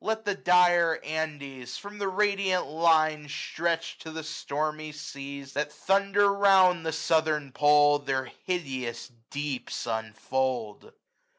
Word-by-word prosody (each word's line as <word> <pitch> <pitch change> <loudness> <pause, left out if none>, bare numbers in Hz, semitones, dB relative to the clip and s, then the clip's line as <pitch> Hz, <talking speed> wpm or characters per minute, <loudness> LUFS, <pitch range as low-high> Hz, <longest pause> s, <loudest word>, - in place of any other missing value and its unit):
Let 220 0 -2
the 205 - +1
dire 175 -3 +4
Andes, 140 -5 -5
from 205 +1 -10
the 200 - -1
radiant 195 -1 +1
Line 155 -2 +2
Stretched 165 +3 -3
to 160 - -8
the 160 0 -6
stormy 155 0 -3
seas 140 -2 -8
that 150 0 -2
thunder 200 +3 +2
round 190 -4 +5
The - - 0
southern 155 -3 0
pole, 145 +1 +5
their 135 -2 -2 0.2
hideous 130 -10 -3 0.2
deeps 140 -4 -4
unfold. 115 0 -3
155 Hz, 120 wpm, -27 LUFS, 140-180 Hz, 0.2 s, round